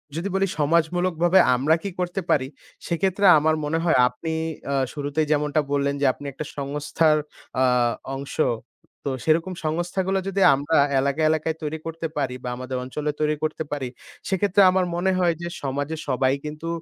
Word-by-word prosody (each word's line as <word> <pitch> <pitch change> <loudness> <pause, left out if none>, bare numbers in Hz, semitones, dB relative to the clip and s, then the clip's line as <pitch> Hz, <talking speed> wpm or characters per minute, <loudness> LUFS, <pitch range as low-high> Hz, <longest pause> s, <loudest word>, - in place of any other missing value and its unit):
যদি 170 +4 -2
বলি 195 0 +2
সমাজমূলকভাবে 170 +3 +2 0.2
আমরা 145 +6 +3
কি 200 - -2
করতে 180 +2 -1
পারি 130 -2 +2 0.4
সেক্ষেত্রে 190 +3 0
আমার 155 +1 +2
মনে 155 +2 0
হয় 165 -6 +3
আপনি 160 +6 -5 0.4
আ - - 0 0.2
শুরুতেই 145 +1 -1
যেমনটা 150 0 +2
বললেন 140 0 +1
যে, - - +3
আপনি 145 - -12
একটা 145 +3 -6
সংস্থার 150 +2 +1 0.4
আ - - +5 0.5
অংশ। 140 +1 -7 0.7
তো 140 - 0
সেরকম 165 +4 +1
সংস্থাগুলো 175 +4 -1
যদি 195 0 -1
আমরা 145 +4 0 0.2
এলাকায়, 140 +3 +1
এলাকায় 160 0 0
তৈরি 155 +1 -3
করতে 165 0 -4
পারি 130 -3 -1
বা 125 - -3
আমাদের 130 0 -4
অঞ্চলে 150 +4 -3
তৈরি 150 0 +2
করতে 155 0 -1
পারি 140 -3 -2 0.4
সেক্ষেত্রে 195 +1 +2
আমার 185 -1 +2
মনে 190 +2 +1
হয় 175 -2 +3
যে 170 - -3 0.2
সমাজে 140 +3 -2
সবাই 130 0 +2
কিন্তু 150 +2 -6
155 Hz, 165 wpm, -24 LUFS, 145-175 Hz, 0.7 s, আ